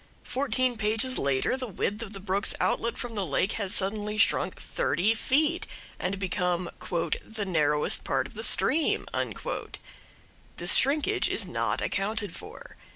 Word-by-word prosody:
Fourteen 255 -2 0
pages 220 +4 +1
later 140 - +1
the 260 -1 -4
width 205 +1 -2
of 220 -4 -6
the 195 - -6
brook's 195 +1 0
outlet 235 0 0
from 245 -2 -4
the 205 -3 -1
lake 180 +4 +1
has 200 -4 -2
suddenly 210 +2 -1
shrunk 200 -2 +2
thirty 180 +9 +1
feet, 300 +9 +1 0.3
and 190 +2 -1
become 180 -2 -1 0.5
"the 220 -2 -4
narrowest 150 -5 +2
part - - 0
of - - -10
the - - -6
stream." 320 0 +2 1.5
This - - +4
shrinkage 310 +8 +3
is - - +2
not - - -1
accounted 205 +2 -1
for. - - -11
210 Hz, 145 wpm, -28 LUFS, 185-250 Hz, 1.5 s, This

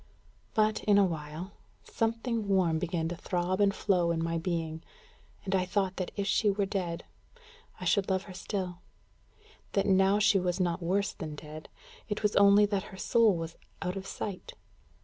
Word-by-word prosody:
But, 215 -1 +2
in 205 -1 +5
a 200 - +6
little 175 -4 +1
while, 155 +5 -7 0.3
something 230 -1 -1
warm 180 -5 +2
began 165 -1 -1
to 175 - -4
throb 180 +3 -1
and 200 -1 +5
flow 180 -3 +1
in 165 -1 0
my 165 0 -1
being; 165 -2 -3 0.6
and 195 - -2
I 185 -1 +3
thought 190 0 -1
that 185 - -2
if 200 - 0
she 210 +1 +2
were 200 0 +1
dead, 185 -4 -3 0.7
I 180 - -6
should 195 +3 +2
love 190 0 +1
her 190 - -10
still; 185 -2 -4 0.9
that 195 - +2
now 195 0 +4
she 210 -1 +4
was 180 0 -1
not 175 0 0
worse 200 +4 0
than 155 -5 -6
dead; 155 +1 -10 0.4
it 210 +1 -3
was 210 - +2
only 200 +1 +7
that 200 -1 -1
her 190 - -11
soul 220 -1 +3
was 165 0 -5 0.3
out 180 0 -2
of 195 0 -6
sight. 195 -1 -6
190 Hz, 185 wpm, -30 LUFS, 170-200 Hz, 0.9 s, only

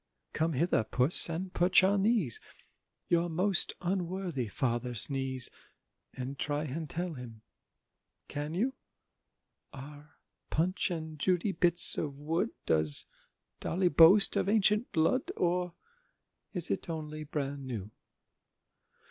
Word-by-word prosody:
Come 160 +1 -1
hither, 150 -4 0
Puss, 125 +10 +3
and 180 +3 -5
perch 180 +1 +3
on 195 +1 +2
these 200 - +1 0.7
Your 170 0 0
most 185 +3 +2
unworthy 180 - -3
Father's 120 +1 -1
knees, 135 -2 -1 0.6
And 130 +2 -7
try 145 0 -3
and 155 +1 -6
tell 175 0 -5
him—Can 125 +5 -12
you? 245 +8 -1 1.0
Are 145 +2 -13 0.3
Punch 180 +6 -1
and 160 -3 -7
Judy 185 +5 0
bits 175 -1 +7
of 140 -3 -5
wood? 165 +9 -2 0.2
Does 80 -2 +4 0.5
Dolly 180 +1 -1
boast 170 +6 +5
of - - -1
ancient 210 +2 +1
blood, 210 - 0
Or 180 0 -1 0.8
is 180 -4 -4
it - - -4
only 155 -1 -6
"bran 140 -2 -5
new"? 110 -5 -7
160 Hz, 115 wpm, -29 LUFS, 140-180 Hz, 1.0 s, bits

